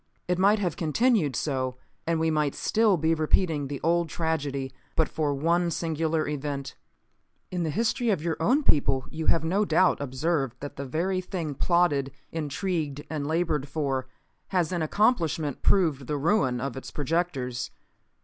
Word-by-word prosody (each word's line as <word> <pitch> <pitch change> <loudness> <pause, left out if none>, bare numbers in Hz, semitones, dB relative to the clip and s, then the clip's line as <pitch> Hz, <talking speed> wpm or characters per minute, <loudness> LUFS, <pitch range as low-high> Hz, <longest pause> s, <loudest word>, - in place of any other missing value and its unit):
It 180 0 0
might 200 +3 +5
have 180 -6 -1
continued 165 - +2
so; 130 -3 -1 0.3
and 165 -1 +1
we 160 0 +2
might 150 -2 +1
still 215 -4 +2
be 160 +1 +2
repeating 155 -1 +1
the 140 -1 -5
old 170 0 +2
tragedy 145 -5 -2 0.2
but 160 - +3
for 150 -2 -1
one 170 +4 +2
singular 160 -1 -1
event. 145 -1 -3 0.8
In 180 -1 -2
the 165 - 0
history 230 - 0
of 200 - +2
your 165 -2 0
own 260 - +3
people 135 - +2
you 160 0 -4
have 165 - +3
no 190 +6 +2
doubt 185 -6 +3
observed 135 -1 -1
that 145 - -7
the 140 - -5
very 185 +7 0
thing 180 -5 -4
plotted, 145 -3 +2 0.2
intrigued 155 -1 -2
and 145 -2 -2
labored 160 -3 0
for, 135 -3 -2 0.4
has 180 -4 0
in 175 -2 -1
accomplishment 160 - +1
proved 155 -9 +2
the 150 - -1
ruin 145 - +2
of 130 -1 -3
its 135 - -7
projectors. 140 -5 -2
160 Hz, 160 wpm, -27 LUFS, 140-175 Hz, 0.8 s, might